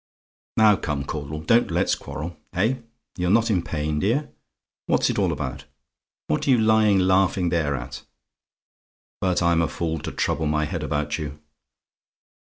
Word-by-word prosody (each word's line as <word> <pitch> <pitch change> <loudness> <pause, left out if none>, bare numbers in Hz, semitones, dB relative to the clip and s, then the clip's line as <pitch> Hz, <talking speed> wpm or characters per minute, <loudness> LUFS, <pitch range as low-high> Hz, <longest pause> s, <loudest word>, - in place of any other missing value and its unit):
"Now, 105 -2 +6
come, 75 -5 -3
Caudle; 75 +1 -5
don't 115 +9 +3
let's - - +1
quarrel. 75 +5 -5 0.2
Eh! 110 +9 +1 0.4
You're 90 -1 0
not 115 +3 +3
in 90 -4 +2
pain, 75 -2 -2
dear? 125 - 0 0.6
What's - - +2
it - - -2
all - - +2
about? 65 - -5 0.6
What 75 - -1
are - - +2
you 130 - +6
lying 110 -2 +4
laughing 95 -1 +2
there 80 -4 0
at? 65 - -7 1.2
But 90 -2 +1
I'm 85 -1 +3
a 85 - +1
fool 80 -1 -3
to - - -5
trouble 75 +2 -1
my 75 0 +1
head 80 +2 -4
about 75 0 -2
you. 75 -1 -6
85 Hz, 160 wpm, -24 LUFS, 75-100 Hz, 1.2 s, Now